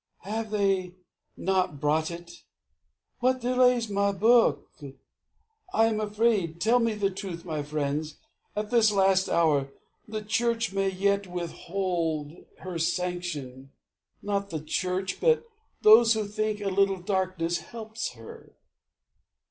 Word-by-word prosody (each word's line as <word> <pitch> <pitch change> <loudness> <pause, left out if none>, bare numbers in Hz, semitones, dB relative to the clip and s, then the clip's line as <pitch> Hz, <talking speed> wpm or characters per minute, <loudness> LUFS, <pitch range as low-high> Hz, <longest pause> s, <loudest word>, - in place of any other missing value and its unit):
Have 220 +3 -4
they 195 -3 0 0.4
not 185 -5 0
brought 155 +2 +1
it? 170 0 -8 0.9
What 255 +1 +2
delays 250 -1 +3
my 200 0 +1
book? 225 +5 +3 1.1
I 225 - +5
am 220 -1 0
afraid. 210 -6 0
Tell 230 +6 +3
me 230 -2 0
the 200 -1 0
truth, 185 -3 -7
my 155 -3 -3
friends. 150 +1 -3 0.4
At 210 +1 -3
this 230 -3 +5
last 190 -1 +3
hour, 145 -5 +2 0.4
the 215 0 -5
Church 230 0 0
may 195 0 +1
yet 200 +1 0
withhold 170 -3 -3 0.3
Her 180 -3 -5
sanction. 160 -7 -3 0.5
Not 200 -1 -2
the 160 -3 -4
Church, 185 +4 -2
but 475 -1 +3 0.4
those 225 +2 +8
who 220 -1 -1
think 215 0 -2
A 200 - -1
little 195 0 +2
darkness 185 -3 -1
helps 220 - -6
her. 115 -2 -13
195 Hz, 125 wpm, -27 LUFS, 170-215 Hz, 1.1 s, those